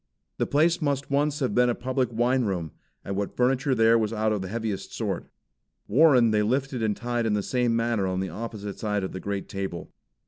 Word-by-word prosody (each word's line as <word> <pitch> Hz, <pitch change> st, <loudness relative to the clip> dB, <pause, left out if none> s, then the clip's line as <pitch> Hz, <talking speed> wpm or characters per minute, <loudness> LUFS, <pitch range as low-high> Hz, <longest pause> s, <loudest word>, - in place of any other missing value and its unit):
The -, -, +1 dB
place 165 Hz, +4 st, +2 dB
must 140 Hz, -2 st, -1 dB
once 145 Hz, +1 st, +1 dB
have 130 Hz, -, 0 dB
been 125 Hz, 0 st, +4 dB
a 120 Hz, -, +1 dB
public 130 Hz, -1 st, -1 dB
wine 120 Hz, +3 st, +2 dB
room, 85 Hz, -6 st, -2 dB, 0.3 s
and 100 Hz, -, -3 dB
what 100 Hz, 0 st, -3 dB
furniture 130 Hz, +2 st, +2 dB
there 115 Hz, 0 st, +5 dB
was 110 Hz, -1 st, 0 dB
of 110 Hz, -2 st, 0 dB
the 95 Hz, -, -4 dB
heaviest 110 Hz, -1 st, -4 dB
sort. -, -, -3 dB, 0.6 s
Warren 125 Hz, -2 st, +5 dB
they 105 Hz, -1 st, +3 dB
lifted 130 Hz, +3 st, -1 dB
and 110 Hz, -2 st, 0 dB
tied 120 Hz, 0 st, -1 dB
in 110 Hz, -, +1 dB
the 105 Hz, -1 st, 0 dB
same 120 Hz, -1 st, +1 dB
manner 115 Hz, -4 st, 0 dB
on 95 Hz, 0 st, -1 dB
the 95 Hz, 0 st, -2 dB
opposite 105 Hz, +1 st, -6 dB
side 105 Hz, -2 st, -1 dB
of 95 Hz, -, -3 dB
the 95 Hz, -, -6 dB
great 100 Hz, 0 st, -4 dB
table. 95 Hz, -4 st, -5 dB
115 Hz, 210 wpm, -26 LUFS, 100-130 Hz, 0.6 s, there